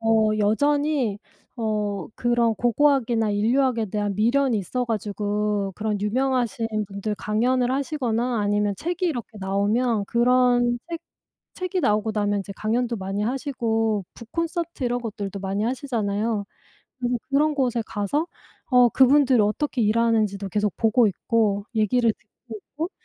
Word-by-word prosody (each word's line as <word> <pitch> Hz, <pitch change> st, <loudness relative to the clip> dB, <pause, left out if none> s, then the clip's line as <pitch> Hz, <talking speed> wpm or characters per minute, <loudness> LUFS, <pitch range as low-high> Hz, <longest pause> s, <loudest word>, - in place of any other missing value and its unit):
어 225 Hz, -1 st, +3 dB
여전히 275 Hz, +1 st, +1 dB, 0.4 s
어 210 Hz, -3 st, -2 dB
그런 240 Hz, -2 st, +1 dB
고고학이나 240 Hz, -2 st, +2 dB
인류학에 230 Hz, +2 st, +1 dB
대한 205 Hz, 0 st, -2 dB
미련이 240 Hz, +2 st, +2 dB
있어 250 Hz, +7 st, -2 dB
가지고 210 Hz, -2 st, -2 dB
그런 210 Hz, -1 st, -2 dB
유명하신 240 Hz, +1 st, 0 dB, 0.2 s
분들 200 Hz, +2 st, -4 dB
강연을 245 Hz, +5 st, +1 dB
하시거나 250 Hz, -4 st, -1 dB
아니면 205 Hz, 0 st, +1 dB
책이 355 Hz, -, -2 dB
이렇게 240 Hz, -, -4 dB
나오면 205 Hz, +3 st, +1 dB
그런 245 Hz, +1 st, +3 dB
책 335 Hz, -1 st, -4 dB, 0.5 s
책이 365 Hz, 0 st, -2 dB
나오고 210 Hz, -2 st, +1 dB
나면 205 Hz, -1 st, 0 dB
이제 200 Hz, +1 st, -7 dB
강연도 235 Hz, +2 st, 0 dB
많이 195 Hz, +1 st, -3 dB
하시고 225 Hz, -5 st, -1 dB
북 230 Hz, 0 st, -13 dB
콘서트 335 Hz, -4 st, -3 dB
이런 245 Hz, 0 st, 0 dB
것들도 200 Hz, -4 st, -5 dB
많이 195 Hz, +2 st, -2 dB
하시잖아요. 225 Hz, -4 st, -1 dB, 0.5 s
그래서 245 Hz, 0 st, 0 dB
그런 300 Hz, +2 st, +2 dB
곳에 245 Hz, -4 st, 0 dB
가서 225 Hz, +10 st, -1 dB, 0.4 s
어 250 Hz, -2 st, +5 dB
그분들 265 Hz, -1 st, +5 dB
어떻게 240 Hz, +5 st, 0 dB
일하는지도 215 Hz, -3 st, +1 dB
계속 210 Hz, +1 st, 0 dB
보고 225 Hz, +1 st, +3 dB
있고 205 Hz, +1 st, 0 dB
얘기를 225 Hz, +2 st, +2 dB
듣고 225 Hz, +2 st, -13 dB, 0.2 s
오고 325 Hz, +4 st, -2 dB
225 Hz, 320 characters per minute, -24 LUFS, 210-255 Hz, 0.5 s, 어